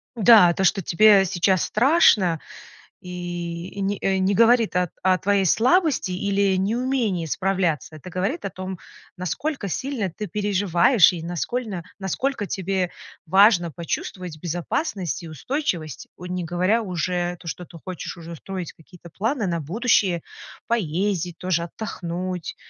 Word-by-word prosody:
Да, 210 -6 +7
то, 190 - -1
что 195 +1 +3
тебе 200 +3 +5
сейчас 185 0 +1
страшно, 215 - +4 0.6
и 175 -1 -5
и, 200 - -10
э, - - -2
не 200 +1 0
э, 190 0 +1
не 190 +2 +2
говорит 230 0 +4
о 180 -2 +1
о 185 -1 +4
твоей 200 0 +1
слабости 270 - +2
или 200 +1 +1
неумении 225 -3 0
справляться. 180 -3 -1
Это 170 +5 -10
говорит 195 - -2
о - - -1
том, 185 -1 -7 0.4
насколько 200 - -3
сильно 235 -1 -2
ты 205 +5 -6
переживаешь 205 0 +3
и 165 - -5
наскольно 185 +3 -3 0.2
насколько 205 +4 -2
тебе 190 -1 -1 0.4
важно 185 -1 +5
почувствовать 170 0 -5
безопасность 175 - -2
и - - -7
устойчивость. 170 - -3
Ой, 180 +1 -8
не 180 -1 -3
говоря 185 +7 +1
уже 180 -2 -2
то, 175 - -13
что 175 +2 -5
ты 170 - -13
хочешь 185 -1 -6
уже 170 0 -8
строить 185 -1 -6
какие-то 170 +1 -16
планы 220 - -1
на 170 -2 -1
будущее, 185 - +1 0.5
поездить 180 -4 -1
тоже, 175 -2 -1
отдохнуть. 180 -2 -5
185 Hz, 145 wpm, -23 LUFS, 175-210 Hz, 0.6 s, Да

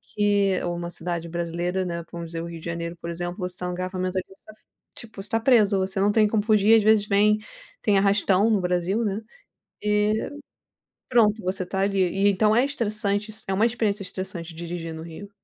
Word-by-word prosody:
que 200 -2 +2
ou 175 0 -2
uma 170 0 -4
cidade 170 -1 -4
brasileira, 175 +2 -2
né, 170 -1 -4
vamos 170 -1 -6
dizer 165 0 -5
o - - -5
Rio 170 -1 -7
de - - -12
Janeiro, 170 0 -4
por 170 0 -7
exemplo, 175 +2 -4
você 180 -1 -5
tá 180 - -5
no 180 - -3
engarrafamento 185 +1 -3
aqui, 185 +1 -4
tá - - -12
f 215 - -27 0.3
tipo, 220 -4 -10
você 195 - -5
tá 225 - +1
preso, 220 -5 +4
você 190 +1 -2
não 205 +1 +3
tem 215 0 +4
como 210 0 +1
fugir, 215 0 +5
às 225 - +5
vezes 215 -1 +4
vem 210 +1 +4 0.5
tem 205 -2 +3
arrastão 200 +1 +3
no 215 - +3
Brasil, 180 +5 0
né, 205 +1 -2 0.6
e 210 +1 +1 0.8
pronto, 225 -3 +3
você 185 0 -2
tá 190 +1 -3
ali 195 0 +1
e 195 +3 +2
então 210 +2 +3
é 245 - +5
estressante 210 -6 -1
isso, 215 0 -6
é - - 0
uma 205 +4 +3
experiência 220 -4 -1
estressante 185 -3 -6
dirigir 170 0 -5
no 160 - -7
Rio. 170 +5 -9
195 Hz, 215 wpm, -25 LUFS, 175-210 Hz, 0.8 s, fugir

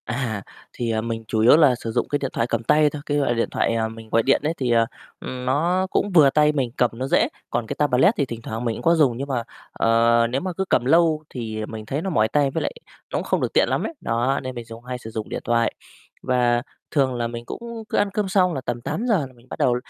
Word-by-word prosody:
À, 115 -4 -3 0.3
thì, 120 -2 -2
à, 110 0 0
mình 115 0 -4
chủ 110 - -1
yếu 115 +7 +7
là 145 -6 +5
sử 115 -1 -5
dụng - - 0
cái 145 - 0
điện 135 -2 -3
thoại 115 - 0
cầm 115 -1 -1
tay 150 +5 +4
thôi, 145 0 -7
cái 145 - 0
loại 140 -4 +2
điện 115 -1 0
thoại, - - +1
à, 110 -1 0
mình 110 0 -10
gọi 115 +1 +3
điện 135 - +3
ấy, 155 +2 0
thì, 125 -3 -1
ờ, 115 -1 +4 0.3
ừm, 125 -1 -6
nó 170 +8 +1
cũng 205 - 0
vừa 155 -6 +7
tay 150 +2 +4
mình, 135 -5 -1
cầm 125 - +3
nó 130 +3 -4
dễ, - - +3 0.2
còn 120 -1 -2
cái - - -4
tablet 145 - +4
thì 140 - +1
thỉnh 115 -2 -7
thoảng 115 +2 -5
mình 115 -2 0
cũng - - -8
có 170 +1 +4
dùng, 135 -7 +3
nhưng 140 +2 -4
mà, 130 -4 -1 0.3
ờ, 115 +1 +3
nếu 130 +3 -1
mà 185 -1 -3
cứ 190 - 0
cầm - - +2
lâu 160 +1 +3
thì 110 -3 -5
mình 110 0 -8
thấy 140 +7 -2
nó 190 - -3
mỏi 110 -11 +2
tay, 140 +2 +1
với - - -2
lại - - -1 0.4
nó - - -1
cũng - - -2
không - - 0
được - - -2
tiện - - +3
lắm - - 0
ấy. - - -4
Đó, 120 +4 0
nên 130 0 -5
mình 120 -1 -6
dùng 115 +1 -11
hay 125 0 -5
sử 115 -2 -9
dụng 110 -1 -5
điện - - -4
thoại 115 -1 +1 0.5
và 120 -2 +2 0.3
thường 135 -4 +2
là 120 -1 -1
mình 120 0 -7
cũng 235 - -7
cứ - - -1
ăn 205 0 +2
cơm 210 -2 -1
xong 185 -2 +3
là 135 - -3
tầm 120 -1 -4
8:00 220 - 0
là 130 - -18
mình 120 +1 -22
bắt - - -7
đầu 125 - +3
125 Hz, 280 wpm, -23 LUFS, 115-150 Hz, 0.5 s, yếu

